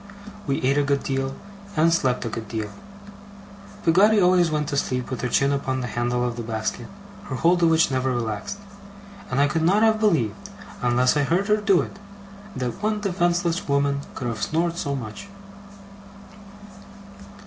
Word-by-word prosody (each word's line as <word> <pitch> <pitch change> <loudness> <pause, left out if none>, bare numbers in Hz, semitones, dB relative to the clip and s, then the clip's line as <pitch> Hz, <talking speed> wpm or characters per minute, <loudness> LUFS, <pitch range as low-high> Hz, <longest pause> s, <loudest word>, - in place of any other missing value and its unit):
We 135 -1 -1
ate 135 +3 +3
a - - +2
good 140 0 0
deal, 135 0 -2 0.4
and 165 +2 +4
slept 125 -7 0
a - - -2
good 115 -1 -6
deal. 110 -1 -4 1.1
Peggotty 200 +6 +5
always 180 -2 +4
went 150 -1 -1
to - - -2
sleep 125 -2 -2
with 130 - -3
her 125 - -1
chin 140 +3 +2
upon 130 -2 -2
the - - -3
handle 120 +1 0
of 120 -1 -3
the - - -3
basket, 110 -1 -3 0.4
her 130 - -4
hold 175 +6 +3
of 165 - +5
which 160 -2 +3
never 130 0 0
relaxed; 120 - -3 0.7
and 130 - -1
I 140 - +5
could 160 +3 0
not 195 +7 +3
have 220 -1 +4
believed 180 - 0 0.3
unless 125 +2 +3
I - - +2
had 140 - 0
heard 185 +4 +1
her 210 - +4
do 200 -4 +3
it, 195 - -8 0.6
that 125 - -4
one 215 0 0
defenceless 175 -3 0
woman 140 0 +1 0.2
could 125 - -4
have 115 -3 -4
snored 170 +1 0
so 140 -5 -2
much. 115 - -7
140 Hz, 180 wpm, -24 LUFS, 125-175 Hz, 1.1 s, Peggotty